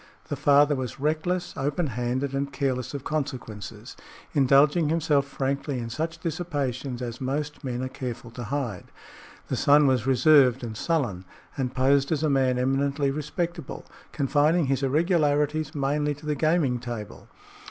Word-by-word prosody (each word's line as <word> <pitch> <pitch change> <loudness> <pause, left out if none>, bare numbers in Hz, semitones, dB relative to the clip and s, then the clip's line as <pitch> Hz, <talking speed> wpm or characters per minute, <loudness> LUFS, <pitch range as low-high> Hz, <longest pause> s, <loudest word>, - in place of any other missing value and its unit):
The 145 - -1
father 145 +1 +4
was 130 -3 -4
reckless, 160 +5 -1
open 145 +5 -1
handed 130 +2 -2
and 140 0 -2
careless 135 -2 -2
of 140 - -5
consequences, 130 -9 -5 0.4
indulging 145 +3 +4
himself 150 -3 +2
frankly 140 0 -2
in 115 -1 -5
such 160 +6 -3
dissipations 140 -7 -3
as 120 +1 -6
most 145 +4 -3
men 125 -1 -3
are - - -2
careful 125 -2 -6
to 120 +1 -7
hide. 125 -7 -3 0.6
The - - -1
son 145 +1 +5
was 130 -3 +2
reserved 130 -1 +5
and 110 -2 -5
sullen, 120 - -1 0.3
and 130 -2 -2
posed 135 +2 +3
as 155 -1 0
a 155 - +2
man 130 -2 +2
eminently 135 +2 +1
respectable, 160 +4 -4 0.3
confining 150 +3 +2
his 135 0 0
irregularities 150 0 +1
mainly 145 +1 0
to 145 +2 -14
the 150 - 0
gaming 150 -4 +1
table. 120 -4 -7
140 Hz, 150 wpm, -26 LUFS, 130-150 Hz, 0.6 s, son